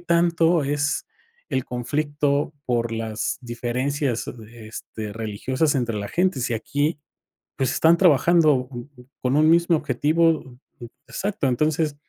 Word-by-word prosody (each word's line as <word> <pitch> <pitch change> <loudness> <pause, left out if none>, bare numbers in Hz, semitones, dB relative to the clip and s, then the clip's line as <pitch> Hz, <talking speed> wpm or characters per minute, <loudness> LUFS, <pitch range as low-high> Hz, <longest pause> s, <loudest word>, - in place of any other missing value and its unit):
tanto 170 -1 +2
es 145 +1 -1 0.4
el 130 - -1
conflicto 145 +3 -1
por 120 -2 0
las 110 -1 -3
diferencias, 125 +2 -2
eh, 115 -1 -10
este, 110 0 -7
religiosas 125 +8 -1
entre 120 -4 -1
la 100 -1 -4
gente. 180 -5 +1
Si 120 0 -1
aquí, 145 +7 -1 0.6
pues, 135 -3 +1
están 165 +1 +4
trabajando 155 -5 +4
co 120 -1 -8 0.3
con 130 +2 +1
un 155 +1 +5
mismo 170 0 +4
objetivo 155 +3 +2
o" 135 -6 -3 0.5
Exacto. 195 -8 -2
Entonces, 155 +3 +1
140 Hz, 130 wpm, -23 LUFS, 120-155 Hz, 0.6 s, un